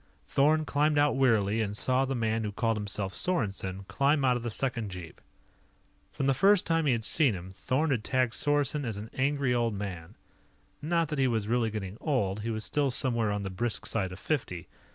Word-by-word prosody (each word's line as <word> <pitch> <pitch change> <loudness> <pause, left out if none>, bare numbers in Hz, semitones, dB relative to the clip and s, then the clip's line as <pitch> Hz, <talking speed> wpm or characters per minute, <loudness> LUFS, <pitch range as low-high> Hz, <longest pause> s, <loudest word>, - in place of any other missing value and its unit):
Thorn 155 +3 +3
climbed 150 +1 +1
out 145 -1 +3
wearily 115 -5 +2
and 105 -1 -2
saw 130 +3 +1
the 135 0 -2
man 115 -1 0
who 105 - -2
called 115 +2 0
himself 100 -2 -3
Sorensen 100 - -2
climb 140 0 +2
out 125 -1 +4
of 120 - -3
the 120 - -3
second 115 -2 -2
jeep. 90 -3 -9 0.9
From 135 - -3
the 135 - +4
first 195 +8 +4
time 165 -2 +1
he - - +4
had 115 -2 0
seen 135 -2 +2
him, 90 +1 -8
Thorn 130 +10 -1
had 120 -5 0
tagged 130 -2 +1
Sorensen 145 0 +1
as 115 -5 -3
an 110 +2 -8
Angry 140 -1 +1
Old 115 -3 0
Man. 95 -5 -6 0.7
Not 165 0 0
that 150 -2 -2
he 135 - +4
was 110 -4 -1
really 115 0 +1
getting 105 -1 -6
old; 105 - 0
he 110 +2 -4
was 110 -1 -3
still 145 -2 +1
somewhere 120 -4 0
on 105 0 -2
the 95 - -4
brisk 110 +5 -2
side 95 -5 -1
of 90 - -8
fifty. 95 - -3
120 Hz, 210 wpm, -29 LUFS, 105-140 Hz, 0.9 s, out